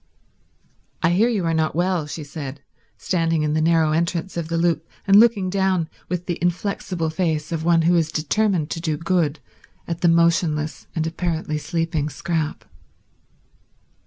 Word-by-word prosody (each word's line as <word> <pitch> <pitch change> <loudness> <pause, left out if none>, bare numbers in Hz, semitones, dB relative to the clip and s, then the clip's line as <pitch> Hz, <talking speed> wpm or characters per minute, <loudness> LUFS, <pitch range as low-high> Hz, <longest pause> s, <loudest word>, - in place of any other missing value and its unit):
"I 165 - +4
hear 210 +7 +3
you 205 -7 0
are 165 - +1
not 160 -1 0
well," 175 -2 0
she 150 +1 -6
said, 140 -1 -7 0.4
standing 165 -3 0
in 150 0 0
the 155 - +1
narrow 160 -1 +3
entrance 170 +3 -1
of 170 -2 -3
the 165 0 -1
loop 165 -1 0 0.2
and 200 +1 +7
looking 220 -5 +4
down 185 -3 +1 0.2
with 180 0 -3
the 175 - -3
inflexible 175 -2 -1
face 155 -2 -1
of 160 -1 -2
one 165 -1 +3
who 175 +2 +4
is 160 -2 +1
determined 165 +1 0
to 165 - -3
do 160 -3 -1
good 165 -3 0 0.5
at 170 -1 -4
the 175 - +4
motionless 165 -2 +1
and 160 -1 0
apparently 160 -2 -2
sleeping 160 -1 -1
Scrap. 155 +2 -3
165 Hz, 160 wpm, -22 LUFS, 155-175 Hz, 0.5 s, and